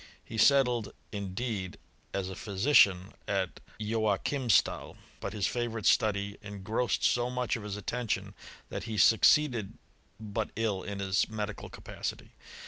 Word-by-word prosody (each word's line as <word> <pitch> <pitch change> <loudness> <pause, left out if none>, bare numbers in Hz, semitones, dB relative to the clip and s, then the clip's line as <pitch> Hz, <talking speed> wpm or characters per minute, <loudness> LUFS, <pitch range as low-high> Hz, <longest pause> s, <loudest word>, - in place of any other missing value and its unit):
He 110 - -5
settled, 125 -4 +4 0.2
indeed, 100 -1 -4 0.3
as 95 -1 -2
a 95 - -5
phy 100 - -7
sician, 95 -4 +4
at 95 -3 -1 0.2
Joachimstal; 110 +3 +1 0.2
but 100 - -4
his 105 -3 -1
favourite 115 -3 -2
study 100 -1 +2
en 105 -2 -8
grossed 115 +4 0
so 120 0 +2
much 125 0 -1
of 115 - -5
his 105 -1 -5
attention, 110 0 -2 0.4
that - - -5
he 110 -2 -4
succeeded 115 - +4 0.4
but 110 0 -3
ill 105 -4 0
in 100 +1 -5
his 95 -1 +1
medical 110 -1 -5
capacity. - - -6
105 Hz, 135 wpm, -30 LUFS, 100-120 Hz, 0.4 s, settled